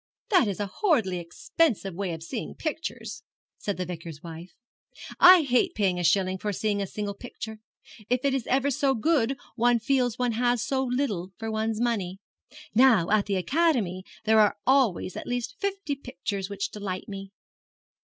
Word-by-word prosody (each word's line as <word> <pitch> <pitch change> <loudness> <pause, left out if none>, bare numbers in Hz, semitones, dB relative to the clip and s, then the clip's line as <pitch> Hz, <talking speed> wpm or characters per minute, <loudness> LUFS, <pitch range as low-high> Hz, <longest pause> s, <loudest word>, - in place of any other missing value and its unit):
'That 365 - +5
is 200 -1 -3
a 205 - 0
horridly 200 - +1
expensive 195 - 0
way 190 0 -3
of 160 -1 -6
seeing 220 +6 -5
pictures,' 315 +1 -5 0.4
said 205 - -3
the 180 - -2
Vicar's 165 -3 -8
wife; 170 +1 -9 0.6
'I 365 -2 +9
hate 250 -3 +2
paying 190 -4 +1
a - - -2
shilling 185 +1 +2
for 210 - -2
seeing 205 +1 -1
a 195 - -2
single 205 +1 -4
picture. 220 0 -8 0.5
If 250 +2 +1
it 275 - +3
is 265 -4 -2
ever 275 +2 +2
so 270 +1 +1
good 270 0 +1 0.2
one 240 0 +3
feels 245 0 +1
one 245 -1 +1
has 225 - -3
had 245 -1 +2
so 265 -1 +1
little 245 -8 -2
for 225 0 -4
one's 220 0 -1
money. 205 -6 -1 0.6
Now 225 -7 +5
at 210 -1 +3
the 200 - 0
Academy 220 - +1 0.2
there 220 0 +4
are 210 -1 +4
always 255 -9 +2
at - - -6
least 245 0 -2
fifty 395 -6 -2
pictures 200 -7 -5
which 200 -1 -3
delight 195 -3 -5
me.' 195 -1 -7
220 Hz, 175 wpm, -27 LUFS, 195-260 Hz, 0.6 s, I